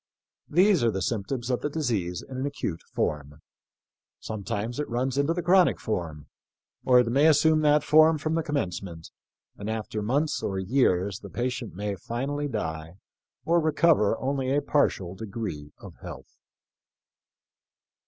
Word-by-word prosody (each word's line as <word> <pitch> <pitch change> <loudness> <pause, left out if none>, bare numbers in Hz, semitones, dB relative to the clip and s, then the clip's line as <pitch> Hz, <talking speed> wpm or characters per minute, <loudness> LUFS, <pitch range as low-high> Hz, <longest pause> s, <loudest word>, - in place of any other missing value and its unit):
These 185 - +4
are 115 - +4
the 95 -3 -2
symptoms 120 +5 -2
of 125 - -1
the 145 - -1
disease 110 - -2
in 130 - -8
an 135 +2 -1
acute 100 -12 -4
form. 75 0 -2 0.8
Sometimes 110 +3 -4
it 150 - -3
runs 125 +2 -1
into 140 +3 +1
the 175 - -2
chronic 185 0 +4
form, 80 -8 -4 0.6
or 125 -1 +5
it - - -1
may 140 +6 +4
assume 155 0 +4
that 150 -1 +4
form 155 +1 +5
from 155 +2 -2
the 165 - +1
commencement, 90 - -4 0.5
and 100 +1 -5
after 110 -1 -3
months 140 +8 0
or 95 - -2
years 95 -2 +1
the - - -10
patient 125 -3 -3
may 105 +1 -3
finally 135 +9 -3
die 80 - -4 0.5
or 170 +1 +3
recover 155 -9 +3
only 135 -1 -2
a 145 - +3
partial 120 -12 +1
degree 95 -8 -6
of - - -12
health." - - -11
120 Hz, 150 wpm, -26 LUFS, 95-145 Hz, 0.8 s, or